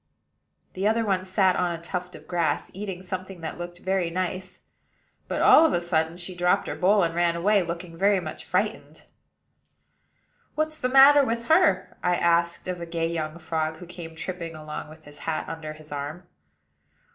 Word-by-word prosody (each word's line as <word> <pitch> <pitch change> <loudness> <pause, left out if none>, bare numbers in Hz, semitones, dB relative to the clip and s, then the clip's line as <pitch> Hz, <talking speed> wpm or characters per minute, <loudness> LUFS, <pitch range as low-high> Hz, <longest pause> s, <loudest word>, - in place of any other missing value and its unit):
The 190 +2 0
other 225 +1 +2
one 190 -2 +1
sat 185 0 +2
on 175 - +1
a 170 - -4
tuft 180 +1 -5
of - - -13
grass, 170 -2 -1
eating 190 -2 -6
something 185 -1 -6
that 160 +1 -6
looked 175 0 -6
very 190 -2 0
nice; 185 +1 -4 0.7
but, - - -1
all 315 - +8
of 320 - +3
a - - +2
sudden, 165 -1 0
she 180 +1 -5
dropped 175 0 +2
her - - -2
bowl, 195 +2 +3
and 165 -1 0
ran 170 0 +2
away, 200 +4 +3
looking 170 0 -5
very 195 +3 +3
much 180 - -6
frightened. - - -2 1.5
"What's 310 0 -1
the 255 - 0
matter 275 +2 +8
with 235 -1 -2
her?" 335 +4 +3
I 180 0 +2
asked 170 0 +1
of 180 -1 -4
a 170 - -5
gay 165 0 -1
young 155 -1 -3
frog 160 -1 -2
who 180 - -10
came 170 -2 -9
tripping 170 -1 -5
along 155 -1 -7
with 155 +1 -14
his 145 -1 -14
hat 160 +2 -3
under 160 -1 -6
his 155 0 -15
arm. 145 +5 -5
175 Hz, 185 wpm, -26 LUFS, 165-190 Hz, 1.5 s, all